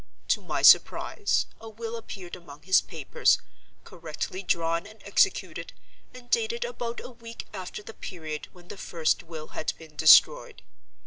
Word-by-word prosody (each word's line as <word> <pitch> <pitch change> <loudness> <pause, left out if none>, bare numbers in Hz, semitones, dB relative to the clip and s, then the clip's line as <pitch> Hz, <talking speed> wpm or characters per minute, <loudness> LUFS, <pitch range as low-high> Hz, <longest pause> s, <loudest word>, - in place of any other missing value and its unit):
To - - +2
my - - -3
surprise, 415 - +4
a 225 - -10
will 225 +1 -6
appeared 195 -6 -8
among 155 -4 -13
his 190 +2 +5
papers, 485 - +1 0.5
correctly 165 +3 -6
drawn 170 -1 0
and 215 +1 -15
executed, - - +1 0.4
and 250 -1 -13
dated 465 - 0
about 240 - -5
a - - -9
week 230 -1 -10
after 190 +1 -7
the 225 - -10
period 155 -7 -7
when 175 -1 -18
the - - -8
first 165 -4 0
will 160 -2 -9
had - - -3
been 160 -2 -15
destroyed. 160 - +5
190 Hz, 150 wpm, -27 LUFS, 165-235 Hz, 0.5 s, his